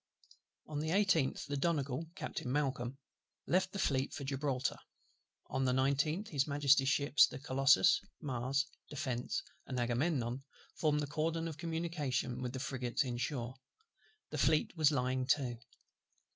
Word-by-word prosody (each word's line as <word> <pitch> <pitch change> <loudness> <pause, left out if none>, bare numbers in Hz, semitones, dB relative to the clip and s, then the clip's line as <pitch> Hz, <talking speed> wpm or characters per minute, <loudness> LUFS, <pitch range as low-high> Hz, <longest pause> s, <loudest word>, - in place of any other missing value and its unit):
On 150 -1 -4
the 155 +1 -2
18th 175 -7 +2
the 145 - -3
Donegal, 145 0 -1
Captain 125 - -4
MALCOLM, 135 -3 -1 0.5
left 185 +1 +2
the 200 - -5
Fleet 140 -7 +1
for 140 - -5
Gibraltar. 135 -1 -1 0.7
On 135 - -1
the 125 - +2
19th 140 +9 +1
his 140 -2 +1
Majesty's 140 -2 +4
ships 140 -1 +5
the - - -7
Colossus, 130 -7 +4 0.2
Mars, 135 +1 -1 0.2
Defence, 135 - -2 0.2
and 130 -2 -2
Agamemnon, 125 +1 0 0.3
formed 150 -2 +1
the - - -1
cordon 160 +3 -1
of 155 -2 -7
communication 160 -7 -2
with 125 -1 -3
the 130 - -4
frigates 125 -1 -1
in 125 -2 -3
shore: 125 -1 -2 0.8
the - - -3
Fleet 155 +4 +2
was 155 -3 +5
lying 130 -2 0
to. 130 -5 +1
140 Hz, 145 wpm, -34 LUFS, 130-155 Hz, 0.8 s, ships